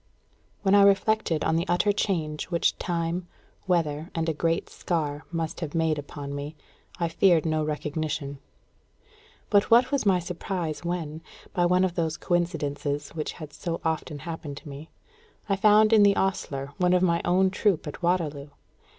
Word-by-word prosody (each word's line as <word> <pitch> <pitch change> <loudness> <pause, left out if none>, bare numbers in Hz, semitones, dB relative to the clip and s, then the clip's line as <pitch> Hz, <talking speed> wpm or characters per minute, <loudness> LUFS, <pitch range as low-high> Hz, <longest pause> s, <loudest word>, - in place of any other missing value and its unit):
When 195 -1 +3
I 205 - +7
reflected 200 -4 +3
on 160 - +2
the 170 +3 -1
utter 180 +4 +2
change 165 -7 -1
which 170 -2 +1
time, 170 0 -2 0.4
weather, 160 -3 0
and 165 0 -1
a 160 - +1
great 165 +2 0
scar 150 -4 -3
must 165 -1 -3
have 160 -2 -5
made 160 -2 +1
upon 140 0 -7
me, 145 +2 -5 0.4
I 170 - +1
feared 170 0 +3
no 155 -1 +1
recognition. 150 -2 -3 1.1
But 205 -1 +4
what 240 +4 +5
was 280 -2 +1
my 195 -3 +4
surprise 175 -2 -4
when, 165 -3 -3 0.3
by 175 -2 +2
one 180 +1 +3
of 185 -2 +1
those 160 -3 -1
coincidences 145 -5 -1
which 155 -2 -4
have 150 -2 -10
so 170 +1 -4
often 160 -1 -2
happened 160 -4 -6
to 150 - -10
me, 145 +3 -9 0.6
I 195 - +2
found 215 +2 +5
in 220 - +7
the 200 -1 +6
ostler 140 -8 -2
one 180 -1 +3
of 180 0 +3
my 170 -2 +2
own 185 +1 +3
troop 195 -4 +1
at 150 - -7
Waterloo! 155 -5 -1
165 Hz, 170 wpm, -26 LUFS, 150-185 Hz, 1.1 s, I